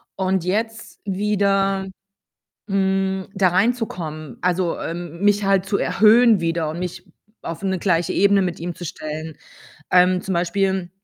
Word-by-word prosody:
und 190 Hz, -2 st, 0 dB
jetzt 220 Hz, +4 st, -3 dB
wieder, 195 Hz, -1 st, +1 dB, 0.8 s
hm, 190 Hz, -1 st, 0 dB
da 190 Hz, -1 st, +3 dB
reinzukommen, 175 Hz, -, -2 dB
also, 180 Hz, 0 st, 0 dB
ähm, 170 Hz, 0 st, -6 dB
mich 205 Hz, 0 st, +3 dB
halt 195 Hz, -1 st, +2 dB
zu 200 Hz, 0 st, 0 dB
erhöhen 220 Hz, -1 st, +5 dB
wieder 165 Hz, -2 st, -1 dB
und 165 Hz, -, -6 dB
mich 180 Hz, +1 st, -5 dB, 0.4 s
auf 165 Hz, +3 st, -6 dB
'ne 190 Hz, -1 st, -1 dB
gleiche 170 Hz, -3 st, +1 dB
Ebene 200 Hz, 0 st, +4 dB
mit 180 Hz, -2 st, -3 dB
ihm 175 Hz, +1 st, -4 dB
zu 175 Hz, -, -9 dB
stellen. 155 Hz, 0 st, -6 dB, 0.5 s
Ähm, 180 Hz, 0 st, +4 dB
zum 190 Hz, -, -3 dB
Beispiel 185 Hz, +1 st, 0 dB
190 Hz, 140 wpm, -21 LUFS, 170-195 Hz, 0.8 s, erhöhen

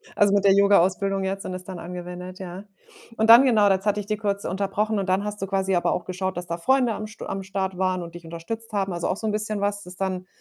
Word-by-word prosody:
Also, 205 Hz, -1 st, +4 dB
mit 200 Hz, 0 st, +2 dB
der 195 Hz, -, +7 dB
Yogaausbildung 195 Hz, 0 st, +3 dB
jetzt 195 Hz, +1 st, -3 dB
und 185 Hz, -, -4 dB
es 185 Hz, -, -7 dB
dann 185 Hz, -2 st, -8 dB
angewendet, 180 Hz, +1 st, -7 dB
ja. 185 Hz, +1 st, -8 dB, 0.5 s
Und 220 Hz, -, +2 dB
dann, 235 Hz, +3 st, +10 dB
genau, 220 Hz, -6 st, +4 dB
jetzt 195 Hz, +2 st, 0 dB
hatte 210 Hz, 0 st, +2 dB
ich 205 Hz, -, -5 dB
dir 215 Hz, +1 st, -2 dB
kurz 200 Hz, -2 st, -2 dB
unterbrochen 205 Hz, +3 st, -1 dB
und 195 Hz, -1 st, -2 dB
dann 190 Hz, +2 st, +2 dB
hast 210 Hz, -1 st, -5 dB
du 195 Hz, -, -2 dB
quasi 195 Hz, 0 st, 0 dB
aber 175 Hz, -, +1 dB
auch 180 Hz, -, -3 dB
geschaut, 185 Hz, 0 st, -3 dB
dass 175 Hz, -, -4 dB
da 170 Hz, 0 st, -4 dB
Freunde 250 Hz, +5 st, +2 dB
am 215 Hz, 0 st, -5 dB
St 215 Hz, -, -11 dB
am 195 Hz, -, -4 dB
Start 190 Hz, -1 st, -3 dB
waren 185 Hz, -1 st, 0 dB
und 170 Hz, -1 st, -9 dB
dich 175 Hz, 0 st, -10 dB
unterstützt 170 Hz, +8 st, -7 dB
haben. 195 Hz, -3 st, -1 dB
Also, 170 Hz, -1 st, -2 dB
auch 185 Hz, -, -1 dB
so 220 Hz, -, -6 dB
'n 215 Hz, -, +1 dB
bisschen 210 Hz, -1 st, -2 dB
was, 205 Hz, 0 st, -1 dB
das 180 Hz, 0 st, -11 dB
dann 185 Hz, -1 st, -3 dB
195 Hz, 270 wpm, -24 LUFS, 185-205 Hz, 0.5 s, dann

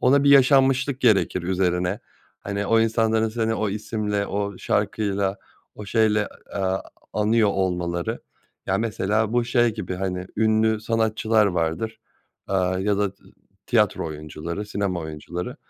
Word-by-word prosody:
ona 140 Hz, +3 st, +4 dB
bir 140 Hz, -, +5 dB
yaşanmışlık 135 Hz, 0 st, +4 dB
gerekir 100 Hz, -6 st, +3 dB
üzerine. 90 Hz, +1 st, 0 dB, 0.4 s
Hani 100 Hz, 0 st, -3 dB
o 115 Hz, +2 st, +4 dB
insanların 110 Hz, 0 st, +2 dB
seni 110 Hz, 0 st, -1 dB
o 110 Hz, -1 st, -1 dB
isimle, 105 Hz, -1 st, -2 dB
o 100 Hz, -1 st, -3 dB
şarkıyla, 100 Hz, -1 st, 0 dB, 0.4 s
o 105 Hz, -, -8 dB
şeyle, 105 Hz, -1 st, +2 dB, 0.3 s
eee, 100 Hz, -, -2 dB, 0.5 s
anıyor 110 Hz, 0 st, +3 dB
olmaları. 90 Hz, -3 st, -1 dB, 0.5 s
Ya, -, -, +1 dB
mesela 110 Hz, 0 st, 0 dB
bu 120 Hz, -1 st, +2 dB
şey 120 Hz, -2 st, +2 dB
gibi 105 Hz, -4 st, -4 dB
hani, 90 Hz, 0 st, -3 dB
ünlü 110 Hz, 0 st, +2 dB
sanatçılar 110 Hz, -1 st, +2 dB
vardır, 95 Hz, +6 st, -2 dB, 0.5 s
aaa, 95 Hz, -1 st, 0 dB
ya 100 Hz, +1 st, 0 dB
da 100 Hz, -2 st, 0 dB
t -, -, -32 dB, 0.4 s
tiyatro 105 Hz, -8 st, +2 dB
oyuncuları, 80 Hz, +5 st, -6 dB
sinema 100 Hz, -3 st, -2 dB
oyuncuları. 85 Hz, -, -6 dB
105 Hz, 135 wpm, -23 LUFS, 95-110 Hz, 0.5 s, bir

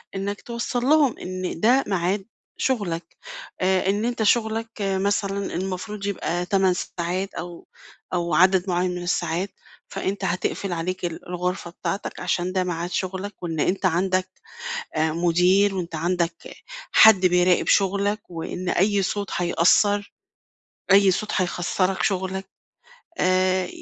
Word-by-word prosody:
إنَّك 200 Hz, +1 st, -3 dB
توصَّل 235 Hz, +1 st, -3 dB
لهُم 290 Hz, -3 st, +4 dB
إن 185 Hz, -2 st, -5 dB
ده 250 Hz, +8 st, +4 dB
ميعاد 190 Hz, +1 st, 0 dB, 0.3 s
شُغلَك. 195 Hz, -10 st, -2 dB, 0.4 s
آآ، 190 Hz, +1 st, +2 dB
إن 205 Hz, +3 st, 0 dB
أنت 240 Hz, -2 st, -1 dB
شُغلَك 225 Hz, 0 st, +1 dB
مثلًا 200 Hz, 0 st, -1 dB
المفروض 195 Hz, +3 st, -4 dB
يبقى 180 Hz, -3 st, -2 dB
8 190 Hz, -1 st, +2 dB
ساعات 180 Hz, +2 st, -3 dB
أو 175 Hz, 0 st, -8 dB, 0.5 s
أو 170 Hz, -2 st, -1 dB
عدد 185 Hz, +3 st, +4 dB
معيّن 180 Hz, +1 st, +1 dB
من 180 Hz, -, -5 dB
الساعات، 175 Hz, +1 st, -1 dB, 0.4 s
فأنت 195 Hz, +1 st, -3 dB
هتقفل 180 Hz, +1 st, -2 dB
عليك 180 Hz, +2 st, -3 dB
ال 170 Hz, 0 st, -6 dB
الغرفة 180 Hz, -1 st, -3 dB
بتاعتَك 195 Hz, +3 st, -4 dB
علشان 180 Hz, +1 st, -1 dB
ده 185 Hz, -1 st, +1 dB
ميعاد 175 Hz, -1 st, -3 dB
شُغلَك، 190 Hz, +1 st, -4 dB
وإن 165 Hz, -3 st, -3 dB
أنت 190 Hz, +4 st, 0 dB
عندَك 185 Hz, +1 st, +1 dB, 0.7 s
آآ، 155 Hz, +1 st, +1 dB
مُدير، 180 Hz, +4 st, +3 dB
وأنت 170 Hz, -3 st, -4 dB
عندَك 170 Hz, +1 st, 0 dB, 0.6 s
حد 200 Hz, -4 st, +7 dB
بيراقب 180 Hz, 0 st, +3 dB
شُغلّك، 200 Hz, +2 st, +2 dB
وإن 175 Hz, +1 st, -5 dB
أي 200 Hz, +2 st, +2 dB
صوت 200 Hz, +1 st, -2 dB
هيأثّر، 190 Hz, +4 st, +2 dB, 0.8 s
أي 195 Hz, 0 st, +7 dB
صوت 210 Hz, +3 st, -2 dB
هيخسرَك 185 Hz, 0 st, 0 dB
شُغلَك. 190 Hz, 0 st, -1 dB, 0.7 s
آآ، 185 Hz, 0 st, +2 dB
185 Hz, 130 wpm, -24 LUFS, 175-200 Hz, 0.8 s, حد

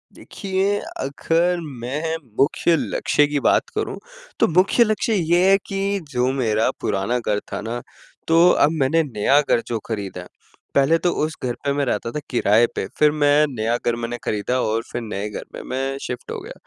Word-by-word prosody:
देखिए, 195 Hz, 0 st, -2 dB, 0.2 s
अगर 165 Hz, +6 st, 0 dB, 0.2 s
मैं 150 Hz, +6 st, -2 dB, 0.2 s
मुख्य 160 Hz, +4 st, +3 dB
लक्ष्य 145 Hz, -, +1 dB
की 145 Hz, -1 st, -1 dB
बात -, -, +2 dB
करूँ -, -, -2 dB, 0.4 s
तो -, -, +5 dB
मुख्य 185 Hz, +8 st, +4 dB
लक्ष्य 215 Hz, +1 st, 0 dB
ये 175 Hz, 0 st, +3 dB
है 195 Hz, -, +6 dB
कि 195 Hz, 0 st, -1 dB
जो 125 Hz, +1 st, +1 dB
मेरा 110 Hz, -1 st, +2 dB
पुराना 100 Hz, +6 st, 0 dB
घर 105 Hz, -3 st, -1 dB
था -, -, -3 dB
ना 120 Hz, +2 st, -4 dB, 0.5 s
तो 165 Hz, +2 st, +6 dB, 0.2 s
अब 150 Hz, -, +1 dB
मैंने 160 Hz, +5 st, +3 dB
नया 135 Hz, +2 st, +2 dB
घर 120 Hz, -4 st, +1 dB
जो 115 Hz, -2 st, -2 dB
ख़रीदा, 100 Hz, -5 st, -5 dB, 0.5 s
पहले 140 Hz, +4 st, +4 dB
तो 175 Hz, +1 st, +1 dB
उस 155 Hz, +1 st, 0 dB
घर 120 Hz, -1 st, -1 dB
पे 140 Hz, -, +1 dB
मैं 140 Hz, -1 st, 0 dB
रहता 115 Hz, 0 st, -2 dB
था 150 Hz, -, -3 dB
किराए 115 Hz, -1 st, +4 dB
पे -, -, -2 dB
फिर 150 Hz, -1 st, +5 dB
मैं 150 Hz, 0 st, +4 dB
नया 115 Hz, +2 st, 0 dB
घर 120 Hz, -1 st, +2 dB
मैंने 120 Hz, +1 st, -4 dB
ख़रीदा 110 Hz, +5 st, -1 dB
और 110 Hz, +1 st, 0 dB
फिर 120 Hz, -, -3 dB
नए 105 Hz, -2 st, -4 dB
घर -, -, -6 dB
में -, -, -6 dB
मैं 135 Hz, +1 st, -2 dB
शिफ्ट 125 Hz, -, -6 dB
हो -, -, -4 dB
गया। -, -, -9 dB
135 Hz, 185 wpm, -22 LUFS, 115-165 Hz, 0.5 s, है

